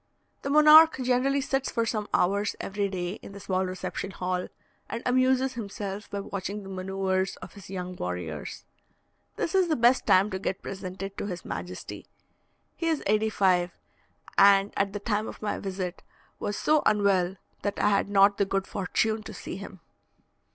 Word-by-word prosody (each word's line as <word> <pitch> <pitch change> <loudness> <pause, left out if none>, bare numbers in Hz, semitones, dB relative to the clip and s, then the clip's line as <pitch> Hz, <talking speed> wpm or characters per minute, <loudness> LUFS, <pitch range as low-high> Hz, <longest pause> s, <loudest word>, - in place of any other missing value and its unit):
The 275 - -4
monarch 305 +2 +8
generally 260 +3 +2
sits 270 -1 -1
for 230 -1 0
some 215 -2 -2
hours 200 +3 +1
every 200 0 -2
day 180 0 -4
in - - -11
the 200 - -9
small 190 -1 -1
reception 185 +1 -4
hall, 180 -1 -3 0.4
and 235 - -4
amuses 255 +1 +2
himself 205 -3 -6
by 200 - -3
watching 200 +1 -5
the 195 - -9
manoeuvres 190 0 -1
of - - -11
his 200 -3 -12
young 180 -1 -5
warriors. 90 - -5 0.7
This - - -2
is 380 -2 +4
the 315 - +1
best 240 +1 +3
time 195 +3 +5
to 190 - -3
get 190 0 -3
presented 195 +1 -6
to - - -3
his 180 -3 -6
majesty. - - -7 0.7
He 330 - -3
is 320 -3 0
eighty 215 +2 +2
five, 180 -4 +2 0.6
and 200 0 +6
at 200 0 +1
the 205 - -3
time 210 +1 -1
of - - -8
my 210 - -1
visit 185 -2 -4 0.4
was 205 - -3
so 305 -1 +3
unwell, 195 -3 +2 0.3
that 205 - -2
I 210 - +3
had 200 0 +1
not 200 0 +5
the 200 - +3
good 195 0 -1
fortune 215 +3 -1
to - - -9
see - - -6
him. - - -10
200 Hz, 175 wpm, -27 LUFS, 190-225 Hz, 0.7 s, monarch